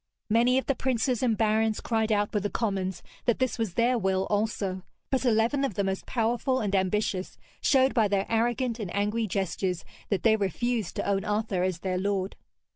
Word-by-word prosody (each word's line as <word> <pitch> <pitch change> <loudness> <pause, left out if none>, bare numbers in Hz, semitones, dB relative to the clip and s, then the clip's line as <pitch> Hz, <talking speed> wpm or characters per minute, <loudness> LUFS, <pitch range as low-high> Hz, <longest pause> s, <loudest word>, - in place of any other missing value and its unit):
Many 240 +3 +4
of 265 - 0
the 275 - +2
princes 250 -2 0
and 235 -4 +2
barons 220 0 +2
cried 220 -1 0
out 205 -1 +1
with 210 - +1
the 205 - -1
commons 190 -5 -2 0.2
that 240 - +2
this 260 -2 -1
was 220 -6 -2
their 240 +1 +3
will 190 -1 +1
also; 205 -3 -1 0.3
but 265 -1 +1
eleven 235 +4 +2
of 265 -9 -1
the 200 - +1
most 190 0 -3
powerful 240 +2 0
and 205 -2 -2
ambitious 190 0 0 0.2
showed 265 -1 +4
by 225 -4 +3
their 195 -1 +1
arrogant 240 +1 0
and 200 -6 -4
angry 210 +2 0
gestures 185 -2 -2 0.2
that 200 - 0
they 225 -1 +5
refused 220 +1 -1
to - - -2
own 195 -1 +1
Arthur 210 -3 -1
as 185 -2 -1
their 185 -1 -1
lord. 195 0 -1
215 Hz, 195 wpm, -27 LUFS, 195-235 Hz, 0.3 s, they